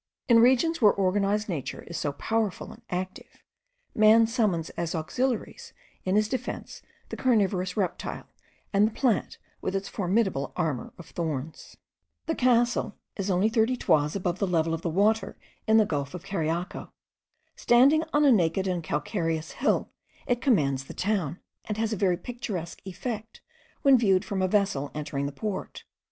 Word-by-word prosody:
In 235 Hz, -2 st, +6 dB
regions 260 Hz, +7 st, +4 dB
where 210 Hz, -2 st, +7 dB
organized 200 Hz, +2 st, +1 dB
nature 160 Hz, -9 st, -4 dB
is 170 Hz, -, -9 dB
so 145 Hz, -3 st, -2 dB
powerful 220 Hz, +5 st, -2 dB
and -, -, -14 dB
active, 185 Hz, +1 st, -6 dB, 0.5 s
man 220 Hz, +1 st, +6 dB
summons 215 Hz, -, 0 dB
as 170 Hz, 0 st, -3 dB
auxiliaries 255 Hz, -, -2 dB, 0.3 s
in 185 Hz, +1 st, +1 dB
his 215 Hz, 0 st, +3 dB
defence 260 Hz, +3 st, -5 dB, 0.3 s
the -, -, -5 dB
carnivorous 195 Hz, -7 st, +1 dB
reptile, 195 Hz, -3 st, -3 dB, 0.5 s
and 200 Hz, +2 st, +5 dB
the -, -, -4 dB
plant 240 Hz, -5 st, 0 dB, 0.2 s
with 190 Hz, -, -2 dB
its 195 Hz, 0 st, -2 dB
formidable 190 Hz, -7 st, 0 dB
armour 155 Hz, -8 st, -2 dB
of 175 Hz, -, -11 dB
thorns. 155 Hz, -3 st, -5 dB, 0.5 s
The 320 Hz, -, 0 dB
castle 245 Hz, -5 st, +2 dB, 0.2 s
is 200 Hz, -1 st, -3 dB
only 190 Hz, +3 st, +3 dB
thirty 225 Hz, +2 st, +2 dB
toises 150 Hz, -7 st, +2 dB
above 180 Hz, -1 st, -2 dB
the 200 Hz, -, +1 dB
level 165 Hz, -2 st, +1 dB
of 165 Hz, -, -3 dB
the 170 Hz, -, -2 dB
water 210 Hz, +6 st, +1 dB, 0.3 s
in 220 Hz, 0 st, +5 dB
the 215 Hz, -, +5 dB
gulf 145 Hz, -3 st, -3 dB
of 180 Hz, -, -8 dB
Cariaco. 170 Hz, -2 st, -3 dB, 0.7 s
Standing 275 Hz, +6 st, +5 dB
on 295 Hz, 0 st, +3 dB
a 280 Hz, -, +7 dB
naked 190 Hz, -3 st, +2 dB
and 180 Hz, -2 st, -1 dB
calcareous 160 Hz, 0 st, -2 dB
hill, 280 Hz, -, 0 dB, 0.3 s
it 245 Hz, 0 st, 0 dB
commands 140 Hz, -, +2 dB
the -, -, -10 dB
town, 185 Hz, -5 st, -1 dB, 0.3 s
and 210 Hz, -, -4 dB
has 225 Hz, 0 st, 0 dB
a -, -, 0 dB
very 185 Hz, -3 st, +1 dB
picturesque 190 Hz, -5 st, -6 dB
effect 220 Hz, +3 st, -6 dB, 0.4 s
when 275 Hz, -3 st, +6 dB
viewed 195 Hz, -3 st, +3 dB
from 200 Hz, -3 st, -2 dB
a 185 Hz, -, +2 dB
vessel 190 Hz, -8 st, +1 dB
entering 145 Hz, -2 st, -3 dB
the -, -, -4 dB
port. 195 Hz, +7 st, -5 dB
195 Hz, 165 wpm, -27 LUFS, 170-225 Hz, 0.7 s, where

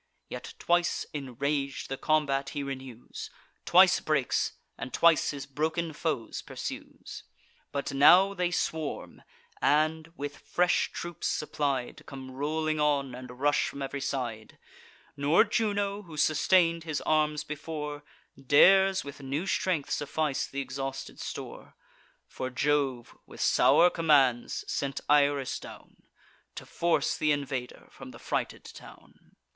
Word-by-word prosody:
Yet -, -, -7 dB
twice, 175 Hz, 0 st, +1 dB
enrag'd, 140 Hz, 0 st, -3 dB
the 135 Hz, -, -3 dB
combat 140 Hz, -2 st, +1 dB
he 145 Hz, -, -1 dB
renews, 130 Hz, -3 st, -7 dB, 0.4 s
Twice -, -, +6 dB
breaks, -, -, 0 dB, 0.2 s
and 130 Hz, -, -7 dB
twice 170 Hz, -2 st, +4 dB
his 140 Hz, -2 st, -5 dB
broken 160 Hz, +4 st, -2 dB
foes 150 Hz, -7 st, -3 dB
pursues. -, -, -8 dB, 0.5 s
But 140 Hz, -1 st, -3 dB
now 180 Hz, +8 st, +6 dB
they 180 Hz, -2 st, 0 dB
swarm, 160 Hz, -3 st, -3 dB, 0.4 s
and, 155 Hz, +2 st, +2 dB
with 145 Hz, 0 st, -6 dB
fresh 180 Hz, 0 st, +1 dB
troops 175 Hz, -1 st, -5 dB
supplied, 140 Hz, -4 st, -2 dB
Come 130 Hz, -1 st, -9 dB
rolling 155 Hz, +3 st, -1 dB
on, 140 Hz, -3 st, +1 dB
and 125 Hz, 0 st, -9 dB
rush 145 Hz, +1 st, +2 dB
from 140 Hz, -, -6 dB
ev'ry 140 Hz, +1 st, -4 dB
side: 120 Hz, -6 st, -4 dB, 0.6 s
Nor 145 Hz, +3 st, +4 dB
Juno, 205 Hz, -2 st, -1 dB
who 165 Hz, -6 st, -11 dB
sustain'd 165 Hz, +2 st, +3 dB
his 155 Hz, -3 st, -3 dB
arms 150 Hz, -1 st, +1 dB
before, 150 Hz, -1 st, -5 dB, 0.4 s
Dares 190 Hz, +7 st, +5 dB
with 140 Hz, 0 st, -9 dB
new 140 Hz, +6 st, -3 dB
strength 185 Hz, -5 st, -1 dB
suffice 145 Hz, -1 st, -1 dB
th' -, -, -19 dB
exhausted 135 Hz, 0 st, -5 dB
store; -, -, -7 dB, 0.5 s
For 130 Hz, -, -5 dB
Jove, 135 Hz, -2 st, 0 dB
with -, -, -13 dB
sour 145 Hz, +8 st, +5 dB
commands, 140 Hz, -7 st, +2 dB
sent 140 Hz, 0 st, -2 dB
Iris 145 Hz, -2 st, +2 dB
down, -, -, -12 dB, 0.6 s
To -, -, -8 dB
force 170 Hz, -1 st, 0 dB
th' 155 Hz, -, +1 dB
invader 135 Hz, -4 st, -3 dB
from -, -, -11 dB
the -, -, -11 dB
frighted -, -, -3 dB
town. -, -, -15 dB
145 Hz, 130 wpm, -29 LUFS, 135-160 Hz, 0.6 s, Twice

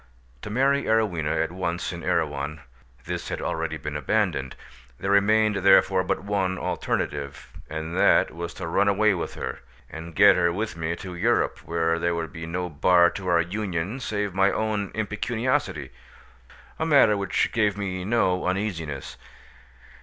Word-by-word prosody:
To -, -, -7 dB
marry 135 Hz, +5 st, +2 dB
Arowhena 90 Hz, -9 st, +1 dB
at 80 Hz, -, -4 dB
once 85 Hz, -1 st, -3 dB
in 85 Hz, -, -7 dB
Erewhon—this 70 Hz, -6 st, -4 dB
had -, -, -3 dB
already 80 Hz, -1 st, -2 dB
been 75 Hz, -1 st, -6 dB
abandoned: 75 Hz, -5 st, 0 dB, 0.4 s
there 95 Hz, -, -1 dB
remained 105 Hz, +1 st, +3 dB
therefore 95 Hz, -1 st, +4 dB
but -, -, -2 dB
one 95 Hz, -2 st, -1 dB
alternative, 70 Hz, -4 st, -3 dB, 0.2 s
and 80 Hz, +2 st, -5 dB
that 95 Hz, -, +4 dB
was 85 Hz, +1 st, -6 dB
to -, -, -6 dB
run 85 Hz, +5 st, +1 dB
away 100 Hz, +1 st, +3 dB
with 85 Hz, -, -4 dB
her, -, -, -5 dB, 0.3 s
and 80 Hz, +1 st, -8 dB
get 100 Hz, 0 st, +7 dB
her 85 Hz, -1 st, +2 dB
with 105 Hz, +3 st, -3 dB
me 85 Hz, 0 st, -2 dB
to 90 Hz, +1 st, -8 dB
Europe, 85 Hz, -, +1 dB
where 85 Hz, 0 st, -1 dB
there 85 Hz, 0 st, 0 dB
would 80 Hz, -3 st, -4 dB
be 80 Hz, 0 st, -7 dB
no 90 Hz, +2 st, -3 dB
bar 85 Hz, +2 st, +4 dB
to 95 Hz, -2 st, -7 dB
our 85 Hz, -1 st, +4 dB
union 95 Hz, +3 st, -3 dB
save 105 Hz, -5 st, -2 dB
my 95 Hz, +1 st, +3 dB
own 105 Hz, -2 st, -1 dB
impecuniosity, 110 Hz, +4 st, -1 dB, 0.9 s
a 160 Hz, -, 0 dB
matter 140 Hz, -9 st, +5 dB
which 100 Hz, -1 st, 0 dB
gave 105 Hz, -3 st, +1 dB
me 95 Hz, -3 st, -3 dB
no 95 Hz, -4 st, +1 dB
uneasiness. 85 Hz, -8 st, -3 dB
90 Hz, 155 wpm, -25 LUFS, 80-105 Hz, 0.9 s, get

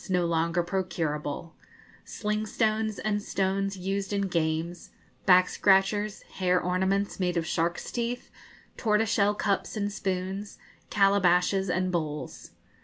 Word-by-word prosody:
no 180 Hz, -2 st, +2 dB
longer 170 Hz, +1 st, +1 dB
procurable 165 Hz, -4 st, -3 dB, 0.5 s
sling 210 Hz, 0 st, -3 dB
stones, 215 Hz, -1 st, 0 dB
and 210 Hz, 0 st, -1 dB
stones 195 Hz, 0 st, -1 dB
used 195 Hz, +2 st, -2 dB
in 200 Hz, -1 st, 0 dB
games, 165 Hz, -1 st, -2 dB, 0.4 s
back 180 Hz, -1 st, +7 dB
scratchers, 205 Hz, +2 st, +2 dB
hair 180 Hz, -1 st, 0 dB
ornaments 190 Hz, +3 st, 0 dB
made 180 Hz, -2 st, 0 dB
of 165 Hz, -, 0 dB
sharks' 170 Hz, +1 st, -1 dB
teeth, 240 Hz, +1 st, -3 dB, 0.5 s
tortoise 220 Hz, -1 st, +2 dB
shell 205 Hz, 0 st, +3 dB
cups 200 Hz, +1 st, -1 dB
and 205 Hz, -1 st, -1 dB
spoons, 190 Hz, 0 st, -3 dB, 0.3 s
calabashes 195 Hz, -1 st, +3 dB
and 185 Hz, +1 st, 0 dB
bowls. 155 Hz, -4 st, -4 dB
190 Hz, 120 wpm, -28 LUFS, 175-205 Hz, 0.5 s, back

